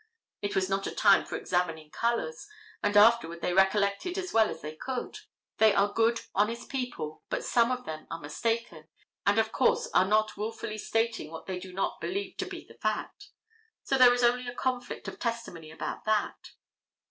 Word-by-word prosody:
It 205 - -2
was 190 -1 +2
not 195 0 -1
a - - -5
time 200 -2 +5
for - - -5
examining 165 -4 -2
colors, 230 - -1 0.3
and 205 0 +2
afterward 205 -6 +5
they 180 - 0
recollected 200 - +2
as 370 -2 -4
well 220 -1 +5
as - - -7
they 155 +1 -6
could. 255 +9 -5 0.4
They 220 -2 +6
are 200 +1 +2
good, 230 +1 +2
honest 220 +4 0
people, 245 - -4
but - - -2
some 235 0 +3
of 250 0 -3
them 155 0 -7
are 165 - -5
mistaken, 170 +1 -3 0.4
and 200 +1 +4
of 220 0 +2
course 475 0 +2
are 185 - +4
not 215 +1 +2
wilfully 215 0 -4
stating 225 -7 -1
what 160 0 -9
they 185 -1 -4
do 185 0 -9
not 195 +2 -2
believe 400 +2 -3
to - - -3
be - - -8
the - - -18
fact. 410 - -3 0.6
So 270 - 0
that 255 - +9
there 245 - +8
is 245 - 0
a 245 0 +2
conflict 250 -1 -3
of - - -7
testimony 230 -9 -4
about 160 - -5
that. 215 -1 -1
215 Hz, 190 wpm, -29 LUFS, 185-240 Hz, 0.6 s, that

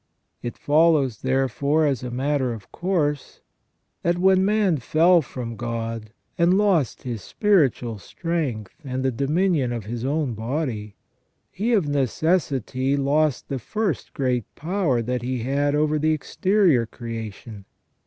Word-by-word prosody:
It 120 - -5
follows, 145 -6 +3
therefore, 135 +4 +1
as 135 -5 0
a 125 - -5
matter 130 0 0
of 100 -4 -11
course, 155 -6 -1 0.6
that 170 +1 +1
when 190 +1 +4
man 200 -4 +2
fell 165 +7 +4
from 120 -4 -6
God, 115 -1 -4 0.3
and 175 +2 +4
lost 190 - +1
his 120 -4 -4
spiritual 135 - +1
strength, 145 - -3
and 130 -1 -3
the 130 - +2
dominion 145 +1 +1
of 115 -4 -4
his 115 +2 -5
own 140 -1 0
body, 110 -3 -3 0.6
he 220 +5 -1
of 195 -9 +2
necessity 140 - 0
lost 145 +1 +1
the 135 - -3
first 210 - -3
great 125 -5 0
power 160 -8 0
that 125 +1 -2
he 125 -1 -3
had 145 +3 +1
over 155 0 +1
the 155 +1 +2
exterior 170 - +2
creation. 115 -3 -7
140 Hz, 135 wpm, -23 LUFS, 120-165 Hz, 0.6 s, when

